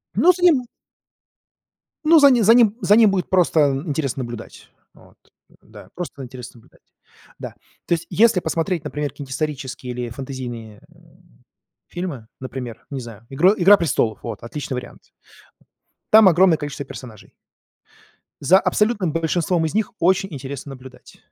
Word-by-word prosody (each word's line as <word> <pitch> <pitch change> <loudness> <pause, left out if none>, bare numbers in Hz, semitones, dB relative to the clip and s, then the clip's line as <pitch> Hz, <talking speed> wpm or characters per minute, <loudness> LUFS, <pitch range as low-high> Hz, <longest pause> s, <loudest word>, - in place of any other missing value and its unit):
Ну, 360 - +5
заниму 340 -8 +3 1.4
Ну, 325 +1 +6
за 280 -1 +7
ним 240 -4 +3
за 225 +3 +6
ним 225 -3 +4
за 205 - +4
ним 220 -3 +5
будет 190 -2 -2
просто 180 -3 +2 0.3
интересно 140 -3 -2
наблюдать. 120 -1 -10 0.2
Вот, - - -21 0.4
да, - - -15
просто 165 -6 -7
интересно 125 -1 -11
наблюдать. - - -27 0.5
Да, - - -7 0.3
то - - 0
есть, 170 0 -3
если 225 -2 +3
посмотреть, 165 0 -2
например, 150 -1 -4
какие-нибудь 140 -1 -10
исторические 135 -3 -4
или 120 -1 -5
фэнтезийные, 120 -4 -8
э, - - -23 0.9
фильмы, 170 -11 -6
например, 130 -3 -8
не 135 -2 -4
знаю, 115 -1 -12
игр 180 +9 +3
"Игра 200 +3 +6
престолов", 120 - -1
вот, 115 -3 -7
отличный 130 +2 -5
вариант. 125 - -10 1.0
Там 215 -2 +8
огромное 175 -1 +4
количество 145 -1 -6
персонажей. 115 -5 -12 1.1
За 175 +7 +5
абсолютным 210 -6 0
большинством 165 +1 0
из 160 - -3
них 220 +2 -1
очень 190 +3 +2
интересно 140 0 -7
наблюдать. 130 -1 -14
150 Hz, 145 wpm, -21 LUFS, 130-190 Hz, 1.4 s, Там